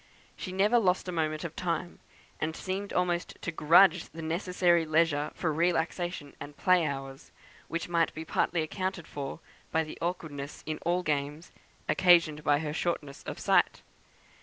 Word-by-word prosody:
She 185 Hz, -, -6 dB
never 205 Hz, +6 st, +3 dB
lost 185 Hz, -3 st, +1 dB
a -, -, -2 dB
moment 155 Hz, -2 st, -1 dB
of 165 Hz, -2 st, -6 dB
time, 175 Hz, 0 st, -3 dB, 0.4 s
and 160 Hz, +1 st, -2 dB
seemed 195 Hz, +2 st, -4 dB
almost 175 Hz, -1 st, -1 dB
to 170 Hz, -, -4 dB
grudge 165 Hz, +3 st, +5 dB
the 165 Hz, 0 st, -8 dB
necessary 175 Hz, +1 st, +2 dB
leisure 155 Hz, -2 st, +2 dB
for 160 Hz, -3 st, -1 dB
relaxation 170 Hz, -1 st, -1 dB
and 145 Hz, 0 st, -9 dB
play 180 Hz, -3 st, +3 dB
hours, 135 Hz, 0 st, -6 dB, 0.4 s
which 170 Hz, 0 st, -3 dB
might 170 Hz, -2 st, +2 dB
be 160 Hz, +1 st, -6 dB
partly 165 Hz, 0 st, 0 dB
accounted 185 Hz, +1 st, -3 dB
for 140 Hz, +2 st, -6 dB, 0.3 s
by 160 Hz, -, +2 dB
the 155 Hz, -, -9 dB
awkwardness 155 Hz, -5 st, -4 dB
in 155 Hz, 0 st, -3 dB
all 175 Hz, +2 st, 0 dB
games 150 Hz, +1 st, -2 dB, 0.4 s
occasioned 170 Hz, -4 st, +4 dB
by 145 Hz, -1 st, +4 dB
her 150 Hz, -2 st, -3 dB
shortness 150 Hz, -4 st, -3 dB
of -, -, -4 dB
sight. -, -, +2 dB
165 Hz, 160 wpm, -29 LUFS, 155-180 Hz, 0.4 s, grudge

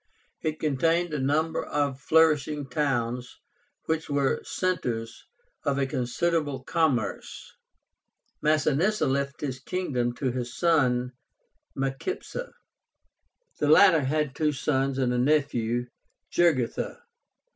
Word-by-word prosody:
It 155 Hz, -1 st, -2 dB
contained 165 Hz, +3 st, +1 dB
a 150 Hz, -, -1 dB
number 150 Hz, +4 st, 0 dB
of 140 Hz, -2 st, -1 dB
flourishing 150 Hz, -2 st, +3 dB
towns, 125 Hz, -3 st, -1 dB, 0.5 s
which 160 Hz, -1 st, -2 dB
were 140 Hz, -2 st, +1 dB
centres 120 Hz, -11 st, -3 dB, 0.4 s
of 140 Hz, -2 st, 0 dB
a 140 Hz, -, +1 dB
considerable 140 Hz, +2 st, -1 dB
commerce. 135 Hz, -10 st, -1 dB, 0.9 s
Masinissa 155 Hz, +7 st, +2 dB
left 140 Hz, +1 st, -1 dB
this 130 Hz, -3 st, -3 dB
kingdom 130 Hz, -7 st, -2 dB
to 130 Hz, -2 st, -1 dB
his 120 Hz, -1 st, -5 dB
son 130 Hz, -7 st, +2 dB, 0.7 s
Micipsa. 255 Hz, -, -3 dB, 1.1 s
The 150 Hz, -, +1 dB
latter 165 Hz, +1 st, +7 dB
had 145 Hz, 0 st, 0 dB
two 155 Hz, +1 st, +1 dB
sons 135 Hz, -1 st, 0 dB
and 125 Hz, -2 st, +1 dB
a 125 Hz, -, +1 dB
nephew, 125 Hz, -4 st, +1 dB, 0.5 s
JUGURTHA. 155 Hz, -9 st, +1 dB
140 Hz, 105 wpm, -27 LUFS, 130-155 Hz, 1.1 s, latter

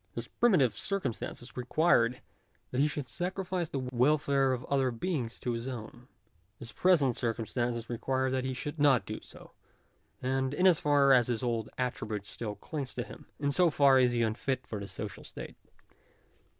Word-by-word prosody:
His 115 Hz, 0 st, -4 dB
primitive 160 Hz, -, +3 dB
circum 190 Hz, -, -1 dB
stances 120 Hz, +2 st, -7 dB
required 125 Hz, -2 st, +2 dB, 0.5 s
that 130 Hz, -, +1 dB
he 150 Hz, -, +4 dB
should 145 Hz, -3 st, -4 dB
sacrifice 180 Hz, +3 st, -3 dB
the -, -, -3 dB
welfare 135 Hz, +1 st, +3 dB
of 125 Hz, -1 st, -3 dB
other 135 Hz, -2 st, +1 dB
beings 125 Hz, -1 st, -3 dB
to 125 Hz, -, -3 dB
his 115 Hz, +1 st, -4 dB
own; 120 Hz, 0 st, -7 dB, 0.5 s
his 115 Hz, -, -8 dB
present 150 Hz, -10 st, +3 dB
circumstances 120 Hz, 0 st, -2 dB
require 130 Hz, +2 st, -1 dB
that 130 Hz, -1 st, 0 dB
he 130 Hz, 0 st, -2 dB
should 145 Hz, +4 st, -5 dB
not 140 Hz, -4 st, +4 dB
do -, -, -6 dB
so; -, -, -13 dB, 0.7 s
and 130 Hz, +1 st, -1 dB
in 180 Hz, -, +2 dB
as 180 Hz, -4 st, +6 dB
far 140 Hz, -2 st, +4 dB
as 125 Hz, -2 st, +5 dB
his 120 Hz, -2 st, -1 dB
old 115 Hz, -3 st, -1 dB
attribute 110 Hz, -5 st, -3 dB
still 105 Hz, 0 st, -5 dB
clings 140 Hz, -1 st, -6 dB
to 120 Hz, -, -2 dB
him, -, -, -12 dB
in 140 Hz, -1 st, 0 dB
so 175 Hz, +3 st, +5 dB
far 140 Hz, -3 st, +5 dB
is 125 Hz, -1 st, +4 dB
he 120 Hz, -1 st, +2 dB
unfit 125 Hz, +4 st, -1 dB
for 105 Hz, -, -5 dB
the 100 Hz, -, -6 dB
social -, -, -6 dB
state. -, -, -9 dB
130 Hz, 175 wpm, -30 LUFS, 120-145 Hz, 0.7 s, as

